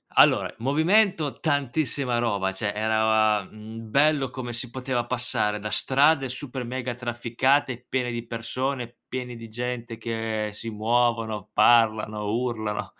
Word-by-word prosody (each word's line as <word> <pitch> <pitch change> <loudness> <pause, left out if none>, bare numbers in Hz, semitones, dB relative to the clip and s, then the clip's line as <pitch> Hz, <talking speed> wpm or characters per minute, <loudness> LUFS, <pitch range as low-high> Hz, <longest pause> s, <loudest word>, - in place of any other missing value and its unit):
Allora, - - +5
movimento, 160 - +2
tantissima 135 -2 0
roba, 100 -5 0
cioè. 100 +2 -3
era, 110 -1 +2
mhmm, 110 +2 -10
bello 140 +1 +3
come 130 -2 -5
si 120 +1 -3
poteva 130 -1 -2
passare 120 -4 0
da 105 - -4
strade 135 +6 +3
super 130 0 -5
mega 125 0 -4
trafficate, 120 +2 0
piene 125 -2 -1
di 120 0 -4
persone, 120 +2 -3
piene 125 -1 -5
di 115 - -9
gente 120 0 -5
che 110 -1 -2
si 115 - -6
muovono, 110 -1 0
parlano, 110 -3 +3
urlano, 110 -2 -2
120 Hz, 130 wpm, -25 LUFS, 110-130 Hz, -, Allora